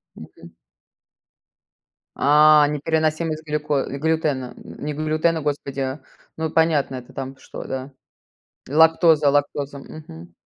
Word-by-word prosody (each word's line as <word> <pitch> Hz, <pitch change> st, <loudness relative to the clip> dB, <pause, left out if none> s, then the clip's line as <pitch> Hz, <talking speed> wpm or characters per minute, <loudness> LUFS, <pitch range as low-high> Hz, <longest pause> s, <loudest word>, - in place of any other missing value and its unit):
Мгм. -, -, -13 dB, 1.7 s
А, 150 Hz, +1 st, +6 dB
непереносимость 155 Hz, +1 st, -1 dB
глюко 150 Hz, -2 st, -1 dB
глютена, 145 Hz, -3 st, -1 dB
не 150 Hz, +1 st, -7 dB
глютена, 155 Hz, +2 st, 0 dB
господи. 140 Hz, -1 st, -3 dB, 0.4 s
Ну, 160 Hz, 0 st, -2 dB
понятно, 155 Hz, -5 st, +1 dB
это 125 Hz, -1 st, -10 dB
там 135 Hz, 0 st, -6 dB
что, -, -, -9 dB
да? 130 Hz, +1 st, -6 dB, 0.8 s
Лактоза 160 Hz, -1 st, +4 dB
лактоза, 145 Hz, 0 st, -1 dB
мгм. 85 Hz, -, -12 dB
150 Hz, 95 wpm, -22 LUFS, 140-155 Hz, 1.7 s, А